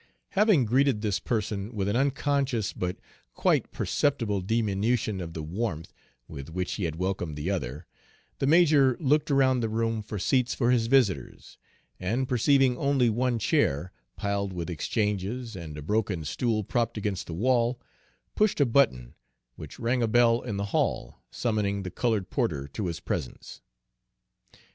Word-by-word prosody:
Having 195 Hz, -, +3 dB
greeted 130 Hz, 0 st, +2 dB
this 100 Hz, -2 st, 0 dB
person 105 Hz, 0 st, -3 dB
with 100 Hz, -2 st, -1 dB
an 100 Hz, -, 0 dB
unconscious 135 Hz, -4 st, 0 dB
but 90 Hz, 0 st, -3 dB, 0.4 s
quite -, -, +1 dB
perceptible 115 Hz, -9 st, 0 dB
diminution 105 Hz, 0 st, 0 dB
of 85 Hz, -2 st, -6 dB
the 80 Hz, -, -4 dB
warmth 85 Hz, -1 st, -4 dB, 0.3 s
with 70 Hz, -1 st, -8 dB
which 90 Hz, +2 st, -3 dB
he 100 Hz, -, -2 dB
had 80 Hz, -2 st, -3 dB
welcomed 90 Hz, -3 st, -2 dB
the 75 Hz, +6 st, -2 dB
other, 75 Hz, -4 st, -4 dB, 0.5 s
the 135 Hz, -, 0 dB
major 150 Hz, -5 st, +5 dB
looked 150 Hz, +1 st, +2 dB
around 135 Hz, -2 st, +3 dB
the 115 Hz, -2 st, -1 dB
room 115 Hz, 0 st, -1 dB
for 105 Hz, 0 st, -6 dB
seats 125 Hz, +5 st, +1 dB
for 120 Hz, -1 st, +2 dB
his 115 Hz, -2 st, +2 dB
visitors, 110 Hz, -, 0 dB, 0.4 s
and 115 Hz, +8 st, -1 dB
perceiving 130 Hz, +1 st, +3 dB
only 135 Hz, -4 st, +2 dB
one 120 Hz, +2 st, 0 dB
chair, 100 Hz, -, +1 dB, 0.2 s
piled 100 Hz, -1 st, -2 dB
with 90 Hz, 0 st, -4 dB
exchanges, 105 Hz, +5 st, -2 dB
and 80 Hz, -4 st, -7 dB
a 75 Hz, -, -7 dB
broken 100 Hz, -3 st, -1 dB
stool 110 Hz, -, -1 dB
propped 115 Hz, +2 st, -1 dB
against 100 Hz, -3 st, -3 dB
the 85 Hz, -, -6 dB
wall, 120 Hz, +3 st, +1 dB, 0.5 s
pushed 215 Hz, -5 st, +1 dB
a 145 Hz, -, +5 dB
button, 115 Hz, -, +2 dB, 0.4 s
which -, -, -10 dB
rang 120 Hz, +2 st, 0 dB
a 115 Hz, -, +2 dB
bell 120 Hz, +1 st, +4 dB
in 105 Hz, -5 st, -4 dB
the 100 Hz, -, -2 dB
hall, -, -, -1 dB
summoning 105 Hz, -4 st, -1 dB
the 90 Hz, -, -5 dB
colored 110 Hz, -4 st, -1 dB
porter 70 Hz, -1 st, -1 dB
to 95 Hz, +7 st, -4 dB
his 85 Hz, -1 st, -4 dB
presence. 80 Hz, -5 st, -5 dB
110 Hz, 160 wpm, -27 LUFS, 95-125 Hz, 0.5 s, major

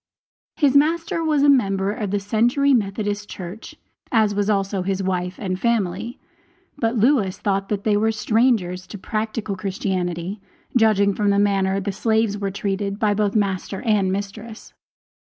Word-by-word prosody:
His 285 Hz, -4 st, +2 dB
master 330 Hz, +3 st, +2 dB
was 305 Hz, -3 st, +2 dB
a -, -, +5 dB
member 195 Hz, -7 st, +2 dB
of 210 Hz, -1 st, -3 dB
the 205 Hz, +1 st, 0 dB
Century 240 Hz, +7 st, +2 dB
Methodist 205 Hz, -2 st, -1 dB
Church, 185 Hz, +4 st, -8 dB, 0.4 s
as 220 Hz, -3 st, +3 dB
was 205 Hz, +1 st, 0 dB
also 195 Hz, -1 st, 0 dB
his 195 Hz, +1 st, -2 dB
wife 180 Hz, -1 st, -2 dB
and 185 Hz, -2 st, -3 dB
family; 225 Hz, 0 st, -1 dB, 0.6 s
but 230 Hz, -3 st, -1 dB
Lewis 220 Hz, -5 st, +2 dB
thought 195 Hz, -1 st, -1 dB
that 200 Hz, -2 st, -2 dB
they 210 Hz, -2 st, +2 dB
were 220 Hz, +2 st, +2 dB
strangers 215 Hz, -4 st, +1 dB
to 205 Hz, -, -8 dB
practical 215 Hz, +1 st, -3 dB
Christianity, 185 Hz, -1 st, -3 dB, 0.3 s
judging 210 Hz, -4 st, +4 dB
from 205 Hz, +1 st, 0 dB
the 200 Hz, -, +3 dB
manner 195 Hz, -1 st, +2 dB
that 195 Hz, -, -2 dB
the 200 Hz, -, -2 dB
slaves 220 Hz, +1 st, +1 dB
were 200 Hz, -1 st, -2 dB
treated 200 Hz, 0 st, -3 dB
by 210 Hz, -1 st, +2 dB
both 205 Hz, 0 st, 0 dB
master 195 Hz, -2 st, -1 dB
and 210 Hz, -5 st, +2 dB
mistress. 210 Hz, +3 st, -6 dB
205 Hz, 160 wpm, -22 LUFS, 195-225 Hz, 0.6 s, a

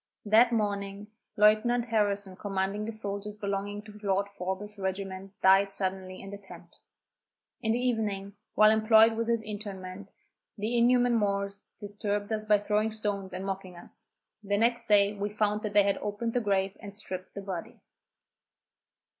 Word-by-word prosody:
That 225 Hz, +3 st, +5 dB
morning, 205 Hz, -1 st, -2 dB, 0.3 s
Lieutenant 215 Hz, +3 st, +4 dB
Harrison 205 Hz, -4 st, 0 dB
commanding 195 Hz, +1 st, -2 dB
the 225 Hz, -, -3 dB
soldiers 205 Hz, -1 st, -5 dB
belonging 205 Hz, 0 st, -3 dB
to 210 Hz, -1 st, -12 dB
Lord 200 Hz, -1 st, 0 dB
Forbes's 200 Hz, +2 st, -5 dB
regiment 190 Hz, 0 st, -5 dB
died 195 Hz, +1 st, +6 dB
suddenly 185 Hz, -1 st, -2 dB
in 195 Hz, -, -9 dB
the 200 Hz, -, -7 dB
tent. 195 Hz, -, -14 dB, 0.8 s
In 220 Hz, -2 st, 0 dB
the 230 Hz, -, +2 dB
evening, 215 Hz, -5 st, -1 dB, 0.2 s
while 215 Hz, 0 st, +7 dB
employed 220 Hz, +1 st, +6 dB
with 230 Hz, 0 st, -2 dB
his 230 Hz, -1 st, +1 dB
interment, 200 Hz, -2 st, -7 dB, 0.5 s
the 215 Hz, +4 st, -1 dB
inhuman 245 Hz, +1 st, +4 dB
Moors 200 Hz, -2 st, 0 dB, 0.2 s
disturbed 205 Hz, 0 st, -3 dB
us 215 Hz, -1 st, -1 dB
by 210 Hz, -1 st, +5 dB
throwing 210 Hz, +2 st, 0 dB
stones 205 Hz, -3 st, -2 dB
and 185 Hz, +1 st, -5 dB
mocking 190 Hz, -2 st, -5 dB
us. -, -, -10 dB, 0.4 s
The 205 Hz, 0 st, 0 dB
next 235 Hz, +2 st, +1 dB
day 205 Hz, -1 st, +5 dB
we 205 Hz, 0 st, -3 dB
found 210 Hz, 0 st, 0 dB
that 210 Hz, -1 st, -4 dB
they 205 Hz, 0 st, +6 dB
had 200 Hz, 0 st, +1 dB
opened 210 Hz, +3 st, -3 dB
the 245 Hz, -, +1 dB
grave 195 Hz, -2 st, 0 dB
and 205 Hz, -2 st, -9 dB
stripped 185 Hz, -3 st, -6 dB
the 200 Hz, -, -6 dB
body. 185 Hz, -4 st, -6 dB
205 Hz, 160 wpm, -29 LUFS, 195-215 Hz, 0.8 s, while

